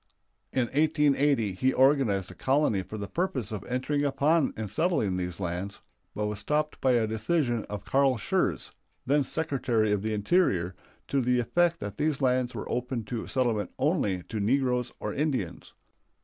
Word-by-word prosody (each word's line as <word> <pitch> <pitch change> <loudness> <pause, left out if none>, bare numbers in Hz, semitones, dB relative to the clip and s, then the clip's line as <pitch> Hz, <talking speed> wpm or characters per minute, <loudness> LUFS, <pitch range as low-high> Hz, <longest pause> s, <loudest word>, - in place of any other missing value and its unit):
In 130 - +1
1880 145 -4 +2
he 130 +8 +1
organized 130 -8 +3
a - - -9
colony 135 -7 +1
for 105 +4 -8
the 100 -1 -5
purpose 130 - -2
of 105 - -4
entering 135 +4 -1
upon 145 +2 +2
and 110 -1 -3
settling 105 - 0
these 90 -1 -3
lands, 90 +2 -4 0.4
but 105 - -1
was 105 -1 -2
stopped 150 +6 -1
by 130 -1 +3
a 115 -2 +3
decision 120 +2 0
of 105 -1 -7
Carl 135 -2 +3
Schurz, - - -1 0.3
then 145 +2 +3
Secretary 125 -8 0
of 105 -2 +1
the 110 +1 -1
Interior, 100 - +2 0.3
to 140 0 +1
the 125 0 +2
effect 170 +7 +2
that 105 0 -6
these 150 -2 +1
lands 125 -2 +1
were - - -5
open 125 -1 -2
to 115 +1 -5
settlement 115 -7 0
only 130 - 0
to 110 - -5
negroes 125 +2 +1
or 105 - -3
Indians. 135 - -2
125 Hz, 165 wpm, -28 LUFS, 105-145 Hz, 0.4 s, organized